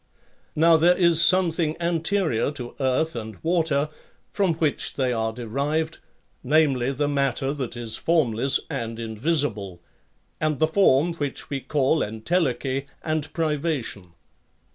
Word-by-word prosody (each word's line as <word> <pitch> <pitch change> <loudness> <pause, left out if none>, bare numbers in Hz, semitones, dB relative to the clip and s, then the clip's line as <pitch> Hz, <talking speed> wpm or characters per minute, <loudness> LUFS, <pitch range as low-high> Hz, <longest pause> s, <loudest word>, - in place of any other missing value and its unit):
Now 165 +1 +5
there 175 +3 +4
is 170 -2 +5
something 165 -2 +2
anterior 170 - 0
to 125 -4 -7
earth 135 +4 0
and 110 -3 -6
water 160 -4 +1 0.4
from 190 -5 +1
which 155 -3 -1
they 130 -2 0
are 110 -1 -1
derived, 140 +8 -2 0.4
namely 135 -3 +2
the 145 +2 -1
matter 140 -1 0
that 130 -5 -5
is 115 -2 -3
formless 135 -6 +2
and 115 -6 -4
invisible, 110 - -2 0.6
and 155 -2 0
the 155 - +3
form 160 -2 +3
which 145 -3 -5
we 140 - -1
call 140 +3 +1
entelechy, 135 - -1 0.2
and 155 -1 -2
privation. 150 - -2
145 Hz, 125 wpm, -24 LUFS, 125-160 Hz, 0.6 s, Now